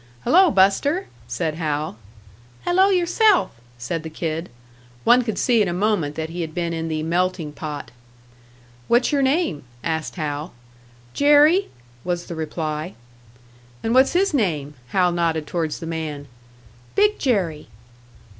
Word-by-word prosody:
"Hello, 370 +1 +5
Buster!" 280 - +2 0.2
said 140 +7 -2
Hal. 150 -2 -2 0.7
"Hello 375 +3 +4
yourself!" 375 +2 +3 0.3
said 125 +7 -3
the 160 - -7
kid. 160 +1 -4 0.5
One 245 +2 +6
could 225 -3 -3
see 235 -3 +3
in 205 - +2
a 175 - -1
moment 180 -6 0
that 160 0 -4
he 175 +1 -4
had 160 0 -5
been 170 -1 -1
in 165 0 -3
the 155 -1 -2
"melting 175 -1 -1
pot." 150 -1 -7 1.0
"What's 240 +4 +3
your 285 -1 +2
name?" 270 - +1 0.2
asked 160 -1 -2
Hal. 150 -1 -4 0.6
"Jerry," 295 +6 +5 0.3
was 175 -1 -2
the - - -7
reply. 155 +1 -4 0.9
"And 225 - 0
what's 260 +3 +5
his 380 0 +2
name?" 155 - 0
Hal 180 +4 +2
nodded 165 -3 0
towards 160 -2 -2
the - - -7
man 155 -3 -5 0.7
"Big 420 +1 +3
Jerry." 185 - 0
175 Hz, 140 wpm, -22 LUFS, 155-260 Hz, 1.0 s, One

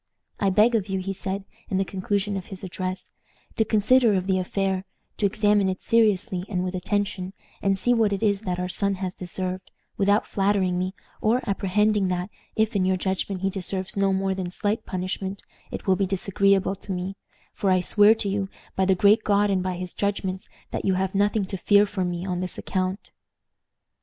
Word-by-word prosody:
"I 200 - +2
beg 215 +5 +4
of 210 -3 0
you," 190 - 0
he 190 +1 -3
said, 195 +1 -4 0.2
in 190 - 0
the 195 - +1
conclusion 200 +2 -1
of 190 -2 -5
his 195 -1 -9
address, 185 0 -5 0.4
"to 220 - +3
consider 220 +1 +4
of 185 -1 0
the 190 -1 +1
affair, 190 0 -1 0.3
to 205 - +3
examine 205 -1 +2
it 185 - -4
seriously 210 -4 +2
and 180 -3 -1
with 185 0 -3
attention, 190 0 -2 0.3
and 195 -1 +2
see 245 +6 +2
what 225 -3 +3
it 200 +2 -2
is 200 -2 +2
that 180 -4 -2
our 180 - -1
son 200 +2 0
has 185 -1 -4
deserved, 185 0 -5 0.3
without 205 +1 +3
flattering 195 -2 +1
me, 185 +2 -2 0.3
or 235 +3 +1
apprehending 205 +1 +2
that, 180 +2 -2 0.2
if 220 0 +1
in 195 - +2
your 185 0 +2
judgment 190 0 -2
he 195 0 0
deserves 190 0 -2
no 195 -1 +2
more 190 0 0
than 185 -2 -3
slight 210 +4 -2
punishment, 190 +1 -4 0.3
it - - -6
will 190 - +4
be 195 +1 0
disagreeable 195 0 +2
to 195 - -8
me; 185 +1 -3 0.4
for 195 - 0
I 185 0 +4
swear 205 +4 +5
to 215 - -3
you, 195 0 -1 0.3
by 190 - +2
the 190 0 +3
Great 205 +4 +4
God 205 0 +3
and 190 -1 +1
by 185 0 -2
his 180 0 -6
judgments, 195 -2 -2 0.2
that - - -3
you 190 - +2
have 190 0 -1
nothing 205 +1 +2
to 195 +1 -5
fear 205 +3 +5
from 190 -3 -2
me 175 +1 -4
on 180 -2 -2
this 185 0 -3
account. 185 +1 -3
195 Hz, 200 wpm, -25 LUFS, 185-205 Hz, 0.4 s, swear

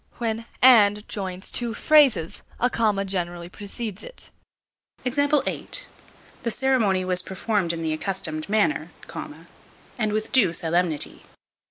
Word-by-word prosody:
When 230 -1 -2 0.2
"and" 210 -4 +6
joins 190 -2 -5
two 235 -2 -2
phrases, 275 - +4 0.2
a 245 +1 +2
comma 210 -3 +1
generally 175 -2 -4
precedes 205 +1 -4
it. - - -9 0.7
The 285 +3 0 0.7
ceremony 220 -7 +1
was 180 -1 0
performed 190 -1 -1
in 165 -1 -4
the 160 -1 0
accustomed 155 -2 -1
manner, 215 +8 +1 1.1
and 215 -2 +1
with 215 +1 -2
due 195 -10 +4
solemnity. 165 -1 0
205 Hz, 115 wpm, -24 LUFS, 180-235 Hz, 1.1 s, and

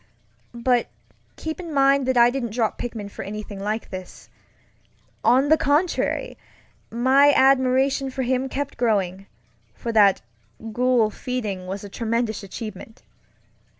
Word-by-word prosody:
But 240 0 +1 0.5
keep 320 +2 -5
in 340 -3 -7
mind 275 -1 +3
that 260 -1 +1
I 240 0 +6
didn't 240 -4 -4
drop 225 -2 -1
Pickman 225 -4 -5
for - - -8
anything 210 -1 -7
like 210 +3 -3
this. 185 -1 -9 0.9
On 260 +5 +4
the 315 - +6
contrary, 340 - 0 0.5
my 265 +5 +4
admiration 265 +1 +3
for 260 0 -3
him 260 +1 0
kept 280 +1 -4
growing; 195 -5 0 0.5
for 235 - -4
that 205 - +4 0.5
Ghoul 245 -2 +2
Feeding 210 -7 -4
was 195 +2 -5
a - - -7
tremendous 230 +1 -2
achievement. 215 +2 -9
245 Hz, 130 wpm, -23 LUFS, 215-270 Hz, 0.9 s, I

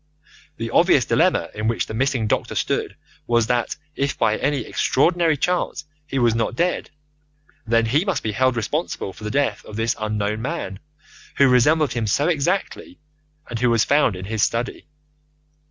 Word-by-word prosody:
The - - -4
obvious - - +4
dilemma - - +2
in 105 +1 -3
which 115 -1 0
the - - -7
missing 130 -1 0
doctor - - -1
stood - - -1 0.3
was 120 -1 +3
that 120 0 0 0.2
if 140 0 -1
by 110 - +2
any 140 +1 0
extraordinary 165 +6 +1
chance 180 0 -1 0.2
he 135 - -3
was 120 -3 +3
not 115 +1 -1
dead, 175 +6 -1 0.8
then 115 0 +3
he 140 +9 +2
must 195 -2 -1
be 110 - -1
held 130 +4 +1
responsible 120 - -3
for 105 - -13
the 105 - -3
death 140 +4 0
of 105 - -10
this 115 +1 0
unknown 105 0 -2
man, 115 - -4 0.6
who 140 - +6
resembled 135 +2 +3
him 115 -2 -2
so 140 +9 +1
exactly, 175 +3 -1 0.5
and 120 -1 -5
who 125 0 +2
was 115 -2 +3
found 140 -8 +3
in 90 +1 -7
his 110 +1 -2
study. 115 +4 -1
120 Hz, 170 wpm, -22 LUFS, 110-145 Hz, 0.8 s, who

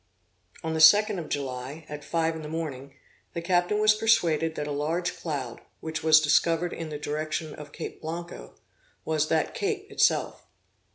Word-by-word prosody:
On 160 0 -2
the 160 - 0
second 205 +5 +7
of 160 - -7
July, 135 +2 -4
at 145 0 -7
five 165 +1 0
in 160 - -6
the 150 - -7
morning, 145 -4 -5 0.4
the 170 - -3
captain 180 +3 +2
was 215 0 +6
persuaded 165 -8 +2
that 150 - -3
a 145 - -4
large 160 +5 -1
cloud, 135 -7 -5 0.2
which 160 -1 -4
was 155 0 +7
discovered 165 +3 +2
in 165 -1 -5
the 150 - -5
direction 155 +1 -3
of 150 -1 -10
Cape - - -7
Blanco, 170 +2 -7 0.5
was 155 -1 +1
that 160 -1 0
Cape 405 -1 -3
itself. - - +1
160 Hz, 170 wpm, -27 LUFS, 150-170 Hz, 0.5 s, second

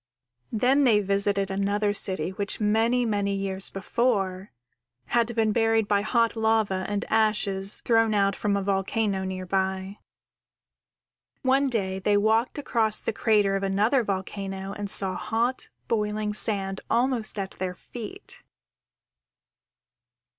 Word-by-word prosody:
_ 220 - -1
_Then 270 +5 +3
they 225 -6 +4
visited 200 0 0
another 200 +1 0
city 185 -4 +1
which, 200 +1 -4
many, 225 +3 +2
many 200 -2 0
years 195 -1 -2
before, 195 -2 -1 0.5
had 235 -1 0
been 220 -2 +2
buried 225 -1 +2
by 200 -1 +2
hot 230 +2 +1
lava 220 -4 +1
and 205 -1 -2
ashes 210 -3 +2
thrown 225 -2 +3
out 200 -1 +2
from 205 -1 0
a 200 - -2
volcano 195 +1 -1
near 185 0 -5
by. 190 +1 -2 1.4
One 270 +1 +2
day 190 -5 -2
they 205 +2 +2
walked 220 +6 +1
across 225 -6 +2
the - - -3
crater 205 -3 +2
of 195 - -1
another 210 +6 +2
volcano 195 -1 -4
and 205 0 -5
saw 190 -1 +2
hot, 235 +6 -2 0.2
boiling 210 -1 -1
sand 195 -2 -1
almost 240 -2 0
at 195 -1 -3
their 180 -1 -3
feet. 245 - -9
205 Hz, 130 wpm, -26 LUFS, 195-225 Hz, 1.4 s, they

